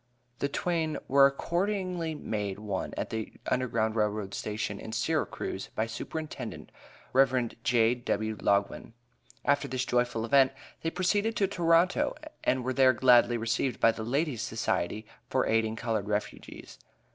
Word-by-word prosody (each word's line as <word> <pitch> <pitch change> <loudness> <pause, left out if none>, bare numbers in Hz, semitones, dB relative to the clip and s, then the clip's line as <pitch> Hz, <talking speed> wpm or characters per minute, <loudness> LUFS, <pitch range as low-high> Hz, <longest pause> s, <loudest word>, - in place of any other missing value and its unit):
The 140 - 0
twain 160 0 -1
were 140 0 +7
accordingly 175 +2 -2
made 105 -8 -3
one 100 -3 -3
at - - -3
the 110 -1 -5
U.G.R.R. 110 -5 0
Station, 105 -1 -3
in 110 - -7
Syracuse, - - -2
by 110 - +1
Superintendent 130 +2 -6 0.4
Rev. 130 -3 +3
J.W. 115 -2 +1
Loguen. 100 +2 0 0.5
After 145 0 +2
this 130 0 -2
joyful 120 -2 0
event, 135 +1 +4 0.3
they 165 - 0
proceeded 205 +6 0
to 200 - +2
Toronto, 180 - +2 0.3
and 130 -1 +1
were 130 +1 -1
there 130 0 +5
gladly 120 -1 +5
received 115 +2 -1
by 115 - +5
the 110 - -7
Ladies' 135 +1 -1
Society 110 -2 -2 0.2
for - - +1
aiding 110 0 +1
colored 110 -3 -2
refugees. 105 0 -5
125 Hz, 135 wpm, -29 LUFS, 110-150 Hz, 0.5 s, were